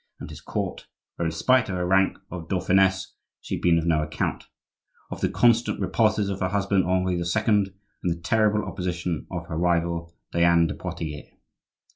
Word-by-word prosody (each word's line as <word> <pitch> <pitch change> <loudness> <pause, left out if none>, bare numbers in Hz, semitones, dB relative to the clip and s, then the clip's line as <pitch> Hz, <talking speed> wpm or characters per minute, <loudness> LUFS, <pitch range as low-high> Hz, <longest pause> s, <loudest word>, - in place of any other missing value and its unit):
and - - -8
his - - -10
court,—where, 85 - -5
in - - -1
spite 120 +8 +2
of 95 - -2
her 90 0 -1
rank 95 +1 +3
of 85 -2 -7
dauphiness, 95 +1 +2 0.3
she - - -7
had - - -2
been 85 -1 +4
of 80 - 0
no 80 -2 +2
account,—or 75 0 -7
the - - +1
constant 120 -1 +3
repulses 105 +2 +1
of 100 -1 -3
her 95 - 0
husband, 100 0 +1
Henri 90 -1 +1
II., 85 - -1 0.2
and 105 -3 +3 0.3
the 85 -2 -1
terrible 105 +4 +2
opposition 90 -3 -3
of - - -5
her 80 - -5
rival, 85 -1 0 0.2
Diane 85 0 +4
de - - -2
Poitiers. 75 -3 -6
90 Hz, 170 wpm, -25 LUFS, 85-100 Hz, 0.3 s, been